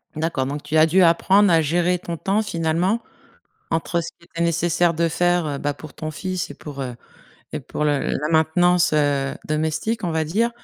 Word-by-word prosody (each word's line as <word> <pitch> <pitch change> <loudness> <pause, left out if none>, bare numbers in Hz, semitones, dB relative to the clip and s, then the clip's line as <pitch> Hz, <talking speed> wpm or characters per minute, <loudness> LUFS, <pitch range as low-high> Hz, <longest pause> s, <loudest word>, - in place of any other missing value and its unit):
D'accord, 155 -4 -1
donc 145 +2 -4
tu 150 +2 -1
as 155 - +7
dû 175 +4 +3
apprendre 185 +3 +4
à 165 -1 +5
gérer 175 +4 +1
ton 170 -1 -6
temps, 200 +6 0
finalement, 175 +3 0 0.7
entre 165 +1 0
ce 170 - -5
qu'il 170 - -20
était 170 - -4
nécessaire 170 +1 +2
de 165 +1 +1
faire, 175 0 +1
heu, 145 -2 -3
bah, 145 +1 -1
pour 145 +1 -12
ton 155 - -5
fils 185 +4 -4
et - - -7
pour, 145 -2 -9
heu, 125 -2 -5 0.6
et - - -2
pour - - -4
le 145 -2 +2
la 150 - -2
maintenance, 175 +2 +3
heu, 145 -2 +1
domestique, 160 +9 -1
on 175 - 0
va 160 0 0
dire, 210 +10 +1
165 Hz, 205 wpm, -22 LUFS, 150-175 Hz, 0.7 s, as